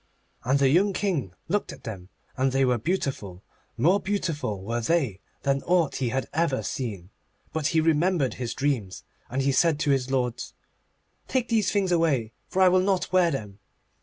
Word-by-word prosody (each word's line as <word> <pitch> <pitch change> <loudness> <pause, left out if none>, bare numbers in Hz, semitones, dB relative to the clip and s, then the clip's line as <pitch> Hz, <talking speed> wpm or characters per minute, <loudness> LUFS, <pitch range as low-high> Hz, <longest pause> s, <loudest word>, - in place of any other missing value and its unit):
And 130 +3 +2
the 140 -1 +3
young 190 +7 +3
King 155 - -2
looked 205 +1 -1
at - - -12
them, 95 -5 -7 0.3
and 130 0 +1
they 135 +1 +2
were 125 -2 +1
beautiful. 130 - -3 0.3
More 185 +6 +4
beautiful 165 - -2
were 115 +4 -2
they 125 - 0 0.2
than 140 0 +1
aught 170 -4 +2
that - - -5
he 125 -3 0
had 130 +2 -2
ever 160 -4 0
seen. 100 -8 -5 0.4
But 155 -2 0
he 160 - +2
remembered 160 -2 +2
his 120 - -3
dreams, 130 -10 -2 0.3
and 135 +2 -1
he 140 - +2
said 155 +2 +3
to 145 - +2
his 135 -2 +1
lords: 125 -3 -2 0.7
'Take 255 -2 -1
these 220 -4 +2
things 195 -3 +1
away, 145 -10 +1
for 190 - +2
I - - +7
will 185 0 +4
not 190 -1 0
wear 180 -2 +5
them. 105 -9 -5
140 Hz, 185 wpm, -26 LUFS, 120-175 Hz, 0.7 s, I